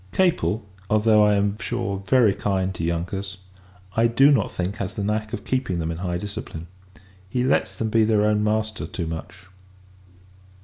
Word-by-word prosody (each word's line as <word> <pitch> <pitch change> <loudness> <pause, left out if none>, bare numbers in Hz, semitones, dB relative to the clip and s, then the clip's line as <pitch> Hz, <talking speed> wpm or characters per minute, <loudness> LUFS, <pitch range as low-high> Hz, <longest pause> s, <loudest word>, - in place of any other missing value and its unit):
Capel 170 - +1 0.2
although, 110 0 +4
I 105 0 +4
am 100 +1 0
sure, 100 -3 -2
very 105 +2 +3
kind 95 -2 -1
to 85 - -5
younkers 95 +4 -3 0.6
I 115 +1 +4
do 135 +5 +5
not 120 -8 +2
think, 95 +3 -3
has 100 -2 -4
the 100 - -3
knack 110 +1 -1
of - - -5
keeping 130 -9 -1
them 80 -1 -2
in 80 - -5
high 90 -1 -2
discipline; 100 -4 -6 0.6
he 125 +5 0
lets 135 +2 +1
them 110 -1 -2
be 115 0 +4
their 105 -1 +3
own 105 0 +2
master 110 0 -1
too 85 - -4
much. 90 +3 -7
105 Hz, 175 wpm, -23 LUFS, 95-110 Hz, 0.6 s, do